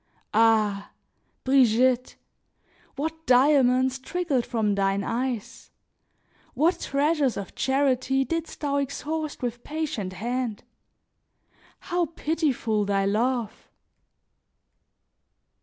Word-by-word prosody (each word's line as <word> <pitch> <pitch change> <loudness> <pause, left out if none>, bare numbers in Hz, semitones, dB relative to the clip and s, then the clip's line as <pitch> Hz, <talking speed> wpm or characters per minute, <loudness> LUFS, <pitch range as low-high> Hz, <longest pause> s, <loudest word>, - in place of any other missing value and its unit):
Ah! 215 -2 +3 0.5
Brigitte! 255 -1 +3 0.8
what 320 +3 -4
diamonds 260 0 +4
trickled 290 -4 -1
from 215 -3 0
thin 195 0 0
eyes! 235 -1 -4 0.9
What 320 +7 +2
treasures 285 -2 +1
of 200 -2 -6
charity 270 0 +1
didst 330 +1 -4
thou 285 -1 0
exhaust 295 +2 -3
with 240 0 -3
patient 295 -12 -4
hand! 235 +1 -3 1.2
How 350 -1 -1
pitiful 275 -9 0
thy 195 -1 0
love! 230 +2 -1
255 Hz, 85 wpm, -25 LUFS, 225-285 Hz, 1.2 s, diamonds